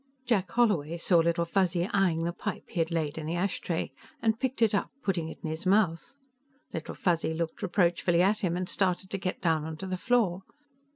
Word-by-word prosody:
IX 255 - -21
Jack 200 -6 +2
Holloway 175 -10 +2
saw 170 +1 +3
Little 170 +1 +2
Fuzzy 180 0 +1
eying 180 -5 +2
the 170 - -1
pipe - - -4
he - - -3
had 165 0 +2
laid 160 -2 -1
in 155 - -5
the 165 - -1
ashtray, 180 -2 -1 0.3
and 220 0 +1
picked 260 -3 0
it 220 - +3
up, 200 - +1
putting 170 -5 -1
it - - -9
in 160 - -2
his 160 +3 -4
mouth. 190 +3 +2 0.6
Little 165 - -5
Fuzzy 165 -2 0
looked 165 0 -3
reproachfully 175 -1 +2
at 205 +3 +3
him 180 -5 0
and 180 0 -2
started 185 0 0
to 195 - -2
get 185 -1 -3
down 160 -4 +2
onto 160 +3 -6
the 185 -1 -2
floor. 205 -5 +1
175 Hz, 210 wpm, -29 LUFS, 165-195 Hz, 0.6 s, saw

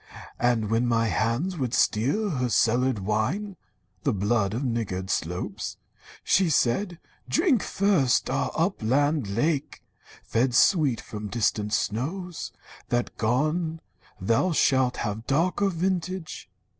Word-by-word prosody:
And 115 -3 +1
when 115 +2 +2
my 115 -1 +2
hands 115 - -1
would 125 -3 -1
steal 145 - +1
her 125 -4 -1
cellared 125 +2 +2
wine, 110 - -1 0.5
(The - - +1
blood 105 +1 0
of 125 - -2
niggard 105 -7 -2
slopes), 90 +1 -3 0.5
she 185 -3 +3
said: 170 +7 +1 0.3
'Drink 270 - +3
first 185 -11 +2
Our 135 +2 0
upland 145 - +1
lake, 135 +8 -1 0.4
fed 125 +2 0
sweet 145 - +4
from 105 -1 -7
distant 105 -1 0
snows. 165 - -2 0.4
That 120 0 -1
gone, 155 +8 0 0.4
thou 115 - +1
shalt 130 -4 +2
have 110 +1 -4
darker 175 +7 +1
vintage.' 180 - -3
125 Hz, 120 wpm, -26 LUFS, 110-165 Hz, 0.5 s, sweet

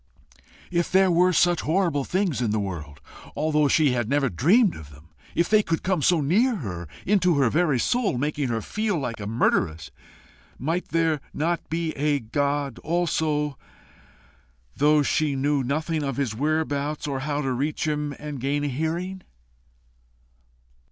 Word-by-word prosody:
If 170 -1 0
there 190 0 +4
were 180 +2 +4
such 175 0 +3
horrible 160 -4 0
things 185 -8 0
in 120 - 0
the 105 +1 0
world, 75 -7 -6 0.4
although 150 -1 +2
she 150 -1 +3
had 120 -3 -1
never 140 -2 +2
dreamed 180 - +3
of 75 -2 -10
them 75 +3 -17 0.3
if 170 - +2
they 215 0 +5
could 165 -5 -2
come 185 -4 0
so 165 +2 +3
near 220 - +2
her, 90 - -5 0.2
into 180 -4 +3
her 130 -5 +3
very 155 -4 +2
soul, 215 - 0
making 145 +1 -1
her 115 -2 -2
feel 215 -3 -1
like 125 -6 -4
a 100 - -5
murderess, 80 - 0 0.7
might 165 +6 -2
there 160 -3 +1
not 170 +3 -1
be 165 0 -1
a 145 0 0
God 140 +1 -2
also, 155 -4 -1 1.2
though 150 +1 +4
she 150 0 +1
knew 140 +1 +1
nothing 155 +4 -1
of 135 -3 -3
his 135 -6 -1
whereabouts 150 +1 -1
or 140 -2 -2
how 145 +1 -2
to 135 - -1
reach 145 +5 -2
him 150 -1 -2
and 150 -4 -7
gain 145 +2 0
a 145 - 0
hearing? 170 +7 -3
150 Hz, 160 wpm, -25 LUFS, 135-170 Hz, 1.2 s, they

